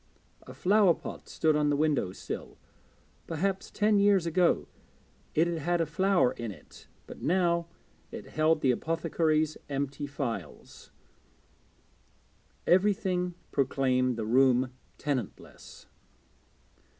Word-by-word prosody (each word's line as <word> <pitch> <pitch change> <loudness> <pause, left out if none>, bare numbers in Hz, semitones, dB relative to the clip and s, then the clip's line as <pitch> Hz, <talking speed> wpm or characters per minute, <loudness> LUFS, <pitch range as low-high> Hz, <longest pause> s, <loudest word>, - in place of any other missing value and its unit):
A - - -9
flowerpot 195 -2 +1
stood 155 -1 +1
on 150 -1 +2
the 145 - +2
window 145 -10 +1
sill; - - -7 0.7
perhaps 190 +4 -2
ten 210 -1 +2
years 200 -3 +4
ago 170 +1 +2 0.7
it 160 - +4
had 170 -1 -2
had 175 +3 0
a 165 - +2
flower 185 -2 +2
in 120 -1 -6
it, 95 - -15 0.2
but - - -11
now 170 -1 +1 0.4
it - - -8
held 155 0 +2
the 130 - +4
apothecary's 155 +1 0
empty 140 +1 -3
phials. 135 -5 -6 1.8
Everything 180 -2 +2 0.2
proclaimed 130 -2 +1
the 110 - -3
room 125 +2 +3 0.3
tenantless. 135 -7 -5
155 Hz, 110 wpm, -29 LUFS, 135-180 Hz, 1.8 s, years